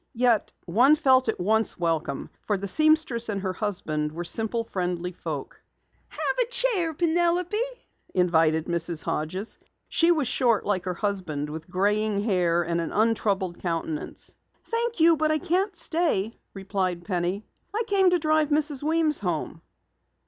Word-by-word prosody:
Yet 235 -2 +2
one 245 - +5
felt 260 -4 +3
at - - -2
once 220 +4 +2
welcome, 165 -5 -2
for 205 - -1
the 195 - -5
seamstress 310 - +2
and 200 -2 -2
her 190 -1 -1
husband 155 -8 -2
were 170 +3 -5
simple, 225 +6 -1
friendly 180 -4 -3
people. 160 -5 -6 0.6
"Have - - -3
a 480 - +1
chair, 455 -10 0
Penelope," 345 +5 +1 0.5
invited 160 -3 +2
Mrs. 170 -1 -2
Hodges. 185 +8 -3 0.3
She 335 - +3
was 305 -6 +1
short 235 -4 +2
like 190 -3 -1
her 180 -1 -2
husband, 170 -8 -2
with 160 +3 -8
graying 205 +2 +1
hair 175 -5 +2
and 170 0 -1
an 165 - -4
untroubled 205 -5 0
countenance. 165 -3 -4 0.3
"Thank 465 -2 -2
you, 325 0 +6
but 310 +1 +1
I 310 - +2
can't 375 +6 0
stay," 315 - +1 0.2
replied 190 -3 -2
Penny. 185 +2 -2 0.3
"I 440 +3 -1
came 390 -4 +4
to 355 - +3
drive 310 -2 +2
Mrs. 295 -2 +1
Weems 315 0 +1
home." - - -3
210 Hz, 150 wpm, -26 LUFS, -, 0.6 s, you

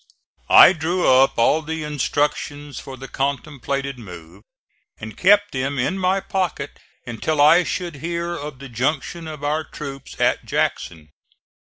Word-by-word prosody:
I - - +9
drew 175 +2 -1
up 130 +1 +4
all 135 +7 +3
the 160 0 -5
instructions 145 -1 -2
for 135 -1 -9
the 135 +1 -9
contemplated 140 -1 -3
move, 90 -3 -12 0.6
and 110 0 -8
kept 205 +2 +4
them 135 +1 -2
in 185 +10 -1
my 185 +1 +2
pocket 180 -8 -3 0.3
until 120 +6 -2
I 160 +5 +6
should 175 -3 -4
hear 170 +3 -3
of 145 -3 -7
the 135 +1 -10
junction 135 +7 -2
of 155 -2 -8
our 150 +2 0
troops 140 -2 -9
at - - +2
Jackson. 80 -3 -2
145 Hz, 145 wpm, -21 LUFS, 130-160 Hz, 0.6 s, I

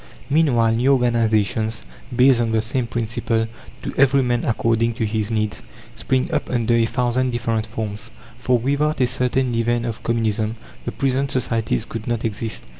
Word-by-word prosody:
Meanwhile 130 -7 +3
new 130 +4 +4
organizations, 110 -3 +1 0.3
based 125 -1 +5
on 115 -1 0
the 110 - +3
same 125 +1 -2
principle 115 -1 -1 0.4
to - - -4
every 140 0 +5
man 120 -1 0
according 115 0 +1
to 115 - -1
his 105 0 -1
needs 105 -2 -1 0.3
spring 130 +3 0
up - - -1
under 120 -2 +1
a 115 -1 +3
thousand 125 +2 0
different 115 -2 -1
forms; 110 0 -5 0.3
for 125 0 +2
without 140 +5 0
a 130 - +4
certain 125 0 0
leaven 120 +1 0
of 115 -2 -4
Communism 110 -1 0 0.3
the - - -2
present 135 0 0
societies 115 - -1
could 115 -1 -7
not 120 -1 -1
exist. 110 +1 -3
115 Hz, 165 wpm, -21 LUFS, 110-125 Hz, 0.4 s, based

